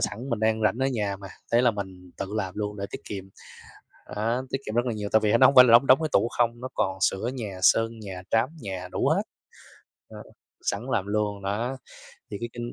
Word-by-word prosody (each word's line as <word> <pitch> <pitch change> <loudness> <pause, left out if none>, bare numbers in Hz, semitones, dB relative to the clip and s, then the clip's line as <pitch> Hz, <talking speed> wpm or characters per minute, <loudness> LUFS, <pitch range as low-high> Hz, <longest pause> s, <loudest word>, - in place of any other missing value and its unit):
sẵn 125 +6 -3
mình 115 -2 -1
đang 110 0 +1
rảnh 110 +3 +2
ở 130 - +1
nhà 105 -7 -1
mà, 95 0 -10 0.2
thế 120 +1 +5
là 120 - +5
mình 95 -3 -8
tự 100 - -4
làm 95 -4 -3
luôn 105 0 -3
để 100 - -4
tiết - - -7
kiệm, 95 -2 -6 0.9
á, 115 +3 0
tiết 135 - -1
kiệm 110 - -5
rất 120 +1 +2
là 120 - -1
nhiều 105 -1 -4
tại 110 - +5
vì 105 - +3
nó - - +5
nóng 135 - +6
phải 125 -1 +10
là 120 - +4
đóng 120 +4 +7
đóng 130 - +7
cái 155 - -1
tủ - - +3
không, 120 0 +1
nó 130 - -4
còn 95 0 -1
sửa 95 +4 +1
nhà, 105 -7 -6
sơn 115 +4 +3
nhà, 95 -4 -7
trám 115 +3 +2
nhà 95 -4 -5
đủ - - 0
hết, - - +2 0.9
ờ, - - -11 0.4
sẵn - - -1
làm - - 0
luôn 105 -1 -1
đó. 115 +7 -2 0.5
Thì - - -4
cái 120 - -3
kinh 120 0 -6
110 Hz, 240 wpm, -26 LUFS, 100-120 Hz, 0.9 s, phải